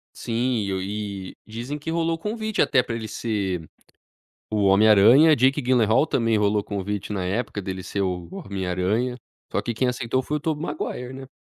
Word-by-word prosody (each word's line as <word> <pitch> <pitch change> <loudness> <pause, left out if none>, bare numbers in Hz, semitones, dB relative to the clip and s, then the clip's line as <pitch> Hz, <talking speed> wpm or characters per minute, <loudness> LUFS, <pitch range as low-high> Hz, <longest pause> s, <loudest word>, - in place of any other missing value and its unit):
Sim. 120 -1 -1 0.2
E 100 -1 -5
dizem 120 +7 -5
que 150 +3 -5
rolou 165 0 0
convite 220 +3 -3
até 125 - +4
para 120 -1 -5
ele 110 - -5
ser 95 -9 -2 0.8
o 105 -2 +1
Homem 100 +3 +5
Aranha, 120 +10 +7
Jake 135 +3 +3
Gyllenhaal 125 +2 +3
também 115 -6 +1
rolou 105 0 +2
convite 100 0 -4
na 95 -3 -2
época, 100 +1 -2
dele 95 0 -5
ser 100 +2 -2
o 90 -2 -2
Homem 95 -1 -5
Aranha, 105 +8 0 0.3
só - - 0
que 120 - -2
quem 125 +4 0
aceitou 125 +1 -1
foi 150 +4 -2
o - - -14
Tobey 155 0 -2
Maguire, 125 -6 -4
né? 135 0 -9
115 Hz, 180 wpm, -24 LUFS, 100-130 Hz, 0.8 s, Aranha